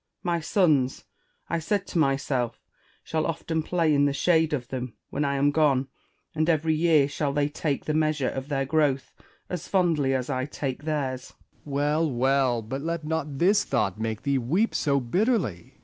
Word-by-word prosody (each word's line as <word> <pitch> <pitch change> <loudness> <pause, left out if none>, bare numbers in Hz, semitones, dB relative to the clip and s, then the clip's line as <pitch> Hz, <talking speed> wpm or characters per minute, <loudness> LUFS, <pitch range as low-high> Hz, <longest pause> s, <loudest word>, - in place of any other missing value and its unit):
My 175 -1 0
sons, 155 -7 +2 0.4
I 170 - -1
said 195 +5 -1
to 170 - -2
myself, 135 -4 0 0.4
shall 160 -1 -1
often 165 0 -2
play 165 -1 +1
in 145 0 +4
the 140 - +1
shade 160 +1 +2
of 125 -5 -3
them 125 -3 -4 0.2
when 145 - -1
I 140 -1 0
am 140 +1 +3
gone; 140 -3 +2 0.4
and 155 +1 0
every 160 0 +2
year 155 -3 +4
shall 145 0 -2
they 145 0 +1
take 145 -1 -2
the 155 - -1
measure 155 -3 +1
of 135 +1 -5
their 135 -2 -1
gi'owth, 145 -2 +1 0.3
as 180 -3 -5
fondly 160 -8 +2
as 130 -1 -2
I 130 -2 -1
take 140 -1 -4
theirs. 135 -5 -2
Essex. - - -16 0.3
Well, 150 +3 +1
well; 130 -2 +1
but 130 +6 -5
let 165 0 -3
not 150 -3 -2
this 200 +6 +4
thought 95 0 -1
make 110 -1 -3
thee 140 -1 +1
weep 175 - +1
so 140 -1 +1
bitterly. 135 - -1
145 Hz, 180 wpm, -26 LUFS, 135-160 Hz, 0.4 s, in